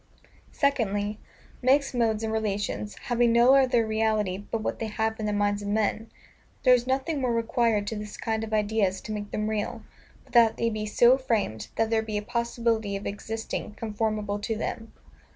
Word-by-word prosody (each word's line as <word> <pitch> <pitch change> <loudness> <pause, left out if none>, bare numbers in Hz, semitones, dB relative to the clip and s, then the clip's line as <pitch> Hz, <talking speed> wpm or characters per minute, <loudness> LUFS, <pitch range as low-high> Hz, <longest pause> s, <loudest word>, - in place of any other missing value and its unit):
Secondly, 210 -7 0 0.4
MIXED 270 +2 +3
MODES 225 -3 +1
and 220 0 -2
RELATIONS, 210 -1 -2
having 240 -2 +2
no 240 +3 +6
other 255 -4 +4
reality 215 -3 0
but 220 +2 -4
what - - -2
they 225 - -2
have 220 +1 -2
in 215 - -2
the - - 0
minds 205 0 0
of 205 - -5
men, 215 +1 0 0.5
there 255 - +7
is 245 0 +2
nothing 270 +3 0
more 250 -2 +1
required 230 -2 +1
to 220 - -3
this 210 0 -7
kind 220 -1 -2
of 220 - -6
ideas 210 -3 +1
to - - -7
make 205 -1 -4
them 215 0 -2
real, 215 -1 -3 0.4
but - - -22
that 230 -2 +5
they 230 0 0
be 215 0 -3
so 240 +5 +5
framed, 210 - -1
that 225 0 0
there 225 -1 +3
be 215 -1 -3
a 205 - -3
possibility 230 -2 -1
of 195 - -5
existing 215 +1 -5
conformable 215 -2 -2
to 225 +2 -2
them. 225 0 -4
220 Hz, 190 wpm, -27 LUFS, 210-235 Hz, 0.5 s, there